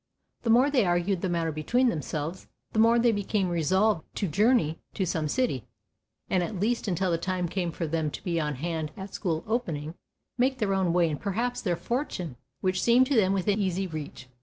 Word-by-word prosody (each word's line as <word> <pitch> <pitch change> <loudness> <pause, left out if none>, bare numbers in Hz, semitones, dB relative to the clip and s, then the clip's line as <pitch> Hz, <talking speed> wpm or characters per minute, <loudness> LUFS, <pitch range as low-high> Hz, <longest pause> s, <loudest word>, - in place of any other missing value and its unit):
The 230 - -2
more 250 +5 +5
they 255 -5 +4
argued 175 +1 +1
the 190 - -1
matter 165 -2 0
between 240 - +2
themselves, 155 - -4 0.3
the 220 - +1
more 230 +1 +6
they 235 0 +4
became 205 -2 0
resolved 175 +3 +2
to 200 - -1
journey 200 - +2 0.2
to 190 - 0
some 160 -3 -1
city, 145 - 0 0.6
and 185 - +1
at 185 +2 -3
least 230 +3 0
until 185 -1 0
the 165 - +1
time 180 0 -1
came 175 -1 -2
for 165 - -3
them 160 -1 -1
to - - -8
be 170 -3 0
on 150 -2 -1
hand 160 +1 -3
at 190 0 -8
school 165 -5 -2
opening, 165 -10 -2 0.5
make 260 +2 +2
their 210 -5 0
own 190 -3 +2
way 170 -1 +3
and 150 -2 -3
perhaps 235 +5 -1
their 180 -5 0
fortune, 185 - -3 0.3
which 185 0 +1
seemed 240 +2 +5
to 275 - 0
them 195 -4 +4
within 195 +2 +1
easy 190 -1 0
reach. 155 -6 -7
185 Hz, 205 wpm, -27 LUFS, 165-220 Hz, 0.6 s, more